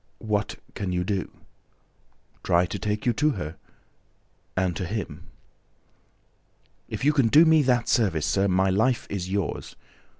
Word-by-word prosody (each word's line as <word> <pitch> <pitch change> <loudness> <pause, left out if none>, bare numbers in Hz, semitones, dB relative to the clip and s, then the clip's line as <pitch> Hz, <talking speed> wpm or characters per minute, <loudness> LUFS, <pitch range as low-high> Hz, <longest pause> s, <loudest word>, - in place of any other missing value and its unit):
"What 105 -2 -2 0.2
can 95 -3 -3
you 90 0 0
do?" 95 -1 -2 1.1
"Try 85 +1 +3
to 100 +3 -5
take 105 +2 -2
you 120 - +3
to 150 +6 +2
her... 75 -1 -5 1.0
and 90 -2 +1
to 90 - -3
him." 105 +3 -5 1.6
"If - - -4
you 150 - +4
can 135 -6 +3
do 150 +8 +7
me 160 -1 +5
that 125 -3 +1
service, 95 - +1
sir, 100 0 +1
my 95 0 +2
life 115 +6 +1
is 95 -2 -3
yours! 100 -3 -3
100 Hz, 145 wpm, -25 LUFS, 90-120 Hz, 1.6 s, do